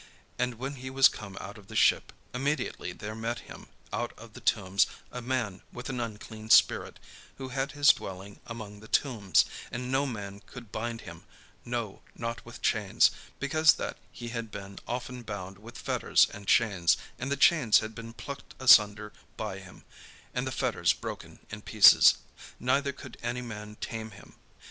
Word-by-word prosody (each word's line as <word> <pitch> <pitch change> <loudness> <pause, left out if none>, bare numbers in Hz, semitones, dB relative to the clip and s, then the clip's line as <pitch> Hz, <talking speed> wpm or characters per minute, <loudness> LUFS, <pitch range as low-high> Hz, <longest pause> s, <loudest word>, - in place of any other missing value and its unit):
And 125 -1 0
when 135 +4 -5
he 130 +1 -6
was 135 0 +7
come 100 -3 -8
out 100 +2 -8
of 100 - -17
the - - -10
ship, - - +4 0.2
immediately 135 -7 -2
there 105 +4 -7
met 115 +2 -3
him - - -12 0.3
out - - -2
of - - -13
the - - -11
tombs 95 +2 +2 0.2
a 125 - -6
man 115 -6 -2
with 125 - -7
an 130 -2 -3
unclean 110 -1 -6
spirit, - - +5 0.4
who 130 -1 -6
had 135 +2 -2
his 145 -1 +5
dwelling 95 +1 0
among 110 -3 -8
the 110 - -13
tombs; 110 -9 +3 0.3
and 125 +1 -4
no 135 +2 +2
man 100 -5 -6
could 120 -4 -11
bind 115 +1 -4
him, - - -11 0.4
no, 120 -4 -4
not 115 +2 -4
with 120 - -12
chains: 105 -4 +3 0.3
because 155 +3 +4
that - - -5
he 120 -1 -7
had 115 -1 -4
been 100 -1 -8
often 125 +1 -4
bound 100 -4 -7
with 115 +3 -11
fetters - - +3
and 100 -1 -10
chains, 95 -8 +3 0.2
and 130 +2 -3
the 140 - +1
chains 140 -7 +5
had 110 0 -2
been 115 0 -8
plucked 140 +3 -9
asunder 105 -4 +6 0.2
by - - -4
him, - - -14 0.5
and - - -2
the - - -2
fetters - - +1
broken - - -8
in 105 0 -6
pieces: 105 -1 +7 0.4
neither 140 +3 +1
could 130 -2 -12
any 120 +1 -3
man 105 -2 -8
tame 110 -1 -5
him. 95 - -15
115 Hz, 175 wpm, -29 LUFS, 105-125 Hz, 0.5 s, was